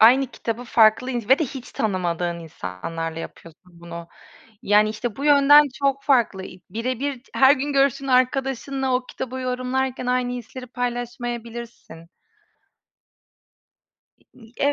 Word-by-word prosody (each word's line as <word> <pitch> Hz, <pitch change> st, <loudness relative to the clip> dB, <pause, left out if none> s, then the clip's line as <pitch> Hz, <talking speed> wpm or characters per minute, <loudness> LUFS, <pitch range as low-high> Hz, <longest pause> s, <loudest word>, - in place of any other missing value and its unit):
aynı 260 Hz, +4 st, +7 dB
kitabı 235 Hz, 0 st, -5 dB
farklı 230 Hz, +2 st, +4 dB
ins 240 Hz, -3 st, -4 dB
ve 265 Hz, -, +6 dB
de 315 Hz, -, +1 dB
hiç 260 Hz, -1 st, -8 dB
tanımadığın 175 Hz, -4 st, -1 dB
insanlarla 165 Hz, -, -6 dB
yapıyorsun 170 Hz, +1 st, -12 dB
bunu. 170 Hz, 0 st, -9 dB, 0.5 s
Yani 210 Hz, +1 st, +4 dB
işte 220 Hz, 0 st, -4 dB
bu 280 Hz, -, -4 dB
yönden 290 Hz, 0 st, +7 dB
çok 275 Hz, 0 st, 0 dB
farklı 235 Hz, -9 st, +2 dB
i 185 Hz, -, -12 dB
birebir 255 Hz, +5 st, -2 dB
t -, -, -26 dB
her 270 Hz, +2 st, +6 dB
gün 285 Hz, +2 st, -3 dB
görüştüğün 275 Hz, 0 st, +2 dB
arkadaşınla 265 Hz, +1 st, +1 dB
o 250 Hz, 0 st, -2 dB
kitabı 260 Hz, 0 st, -6 dB
yorumlarken 255 Hz, 0 st, -2 dB
aynı 250 Hz, 0 st, 0 dB
hisleri 250 Hz, +1 st, -8 dB
paylaşmayabilirsin. 240 Hz, -6 st, -5 dB, 2.3 s
İ 240 Hz, -, -18 dB
i 225 Hz, -, -18 dB
e 290 Hz, -, +3 dB
245 Hz, 135 wpm, -23 LUFS, 215-265 Hz, 2.3 s, aynı